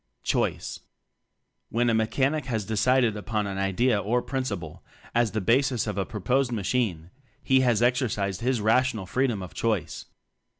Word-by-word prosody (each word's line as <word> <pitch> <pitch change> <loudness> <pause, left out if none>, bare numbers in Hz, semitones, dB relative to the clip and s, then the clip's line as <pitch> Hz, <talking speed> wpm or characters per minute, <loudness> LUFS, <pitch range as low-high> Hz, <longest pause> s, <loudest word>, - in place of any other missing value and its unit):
Choice. - - -1 0.9
A\ - - -5
hen 120 0 +3
a 115 - +3
Mechanic 130 +6 +1
has 110 -5 -2
decided 115 +2 +2
upon 105 0 -2
an 95 -1 -4
idea 100 +4 +2
or 115 +5 0
principle 100 - -4 0.3
as 120 -4 +2
the 110 - -1
basis 125 +3 +2
of 105 -2 -3
a 95 - -1
proposed 125 +5 0
machine, 100 -6 -1 0.3
he 130 0 +4
has 120 -3 +2
exercised 120 -6 0
his 125 -1 0
rational 115 -1 +2
freedom 120 -1 0
of 90 - -9
choice. 100 -9 -2
115 Hz, 155 wpm, -26 LUFS, 100-125 Hz, 0.9 s, he